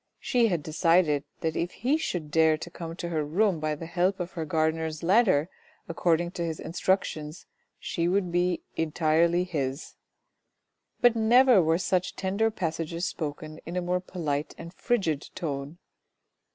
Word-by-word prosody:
She 240 -2 +2
had 175 -7 -1
decided 155 -2 +2 0.2
that 160 -1 -1
if 170 - -1
he 260 +7 +1
should 175 - -3
dare 160 0 +4
to 170 +2 -8
come 165 -2 -7
to 170 - -5
her 160 -3 -1
room 180 +4 +1
by 155 0 -1
the 165 - -8
help 180 +3 0
of 175 0 -4
the 165 -2 -3
gardener's 160 +1 -1
ladder 185 -5 +4 0.4
according 170 0 +1
to 175 -2 -4
his 165 -2 -3
instruc 190 +3 +1
tions, 155 +1 -7 0.3
she 170 0 -2
would 185 -1 +1
be 175 0 0
entirely 165 +2 +2
his. 140 -6 -3 1.1
But 240 -1 +5
never 235 0 +6
were 160 0 +2
such 185 0 -1
tender 200 +4 0
passages 165 -3 -3
spoken 155 -1 -5
in 170 - -7
a - - +1
more 180 +1 0
polite 155 -5 -3
and 170 +1 -9
frigid 185 - -1
tone. 145 0 -4
170 Hz, 160 wpm, -27 LUFS, 155-185 Hz, 1.1 s, never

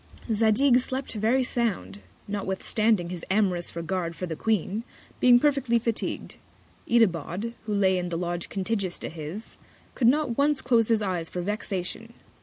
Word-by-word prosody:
Zadig 230 +4 +4
slept 260 +1 -4
very 225 +5 +2
sound, 195 - -2 0.3
notwithstanding 200 -1 0
his 175 -2 -5
amorous 185 -4 +1
Regard 170 0 -3
for 180 - -4
the 165 -2 -4
Queen, 215 +2 -1 0.4
being 245 -1 +7
perfectly 275 -4 +2
fatigu'd. 230 -1 -1 0.5
Itabod, 210 -1 +1
who 210 - -1
lay 190 -2 +3
in 180 0 -3
the 170 - -2
Lodge 175 0 -3
contiguous 195 -2 -2
to - - -5
his, 165 +7 -7 0.4
could 235 - +2
not 275 -2 +2
once 290 0 +2
close 235 -3 +3
his 225 -2 +2
Eyes 180 -4 -2
for 180 - -4
Vexation. 210 +2 -4
210 Hz, 150 wpm, -26 LUFS, 180-235 Hz, 0.5 s, being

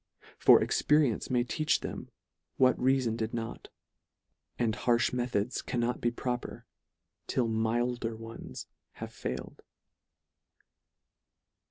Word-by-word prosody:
For - - +8
experience 150 -7 +2
may 125 -2 +2
teach 155 +5 0
them - - -6 0.5
what 130 -1 +5
reafon 130 -3 +2
did 110 0 -2
not; 115 -1 -5 0.9
and 115 -2 +1
harfh 120 +1 +2
methods, 120 -2 -1
cannot 120 0 -1
be 120 - +2
proper, 125 +1 -4 0.6
till 125 -3 +1
milder 115 +1 0
ones 115 +1 -8 0.3
have - - -8
failed. 65 +1 -6
120 Hz, 105 wpm, -30 LUFS, 115-125 Hz, 0.9 s, For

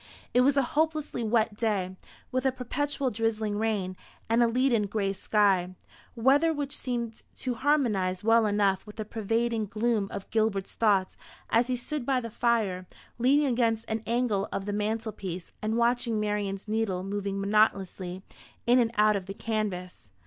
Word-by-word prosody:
It 250 - +5
was 280 +2 +3
a 275 - +4
hopelessly 310 -4 0
wet 220 -1 +1
day, 200 -4 -1 0.4
with 255 0 0
a - - +3
perpetual 270 +2 -2
drizzling 220 -2 -1
rain 205 -4 -1 0.4
and 230 +1 +4
a 235 - +5
leaden 235 -3 +2
gray 200 -1 -1
sky; 190 -3 +2 0.4
weather 275 +7 +4
which 290 -2 -3
seemed 235 -3 -4
to 255 - -3
harmonise 230 -9 +1
well 225 0 +4
enough 205 -1 +1
with 210 - -10
the 215 -1 -4
pervading 225 +1 -1
gloom 215 0 0
of 200 -1 -6
Gilbert's 215 -3 0
thoughts 200 -4 +2 0.3
as 235 +2 +4
he 255 - 0
stood 275 +3 -4
by 260 +1 +1
the 230 -2 -6
fire, 215 -6 0 0.3
leaning 280 +5 +4
against 230 -3 +1
an 220 0 -2
angle 230 -4 0
of 195 - -3
the 205 - -2
mantelpiece, 210 -4 -3
and 220 +1 -1
watching 235 -1 +1
Marian's 205 -1 -2
needle 210 -4 -1
moving 200 0 -3
monotonously 195 -3 +1 0.4
in 245 +2 +5
and 235 -2 +3
out 210 0 +5
of 190 -2 -4
the 195 - -6
canvas. 190 - -3
220 Hz, 165 wpm, -28 LUFS, 200-240 Hz, 0.4 s, It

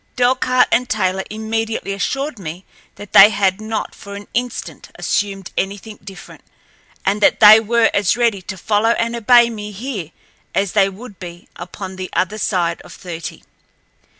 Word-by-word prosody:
Delcarte 255 0 +3
and 250 0 +1
Taylor 190 +1 0
immediately 220 -1 -3
assured 270 +6 -3
me 175 +1 -7 0.3
that 205 - -12
they 200 +2 +10
had 200 -1 0
not 220 0 -4
for 200 0 -10
an 205 0 -9
instant 245 +1 -4
assumed 195 -2 -2
anything 205 +2 -4
different, 195 -1 -12 0.6
and 200 +2 0
that - - +4
they 215 +1 +9
were 225 +1 +2
as 200 +1 +2
ready 230 -5 +1
to 190 +1 -7
follow 215 +4 +1
and 230 +1 -1
obey 235 +1 +5
me 210 -2 -7
here 205 - -6 0.5
as 195 -2 +1
they 195 -2 +3
would 200 +1 -12
be 175 -1 -10
upon 185 +2 -8
the 185 0 -5
other 195 +4 -1
side 175 -5 -1
of - - -14
thirty. 170 -3 -8
205 Hz, 160 wpm, -18 LUFS, 190-225 Hz, 0.6 s, they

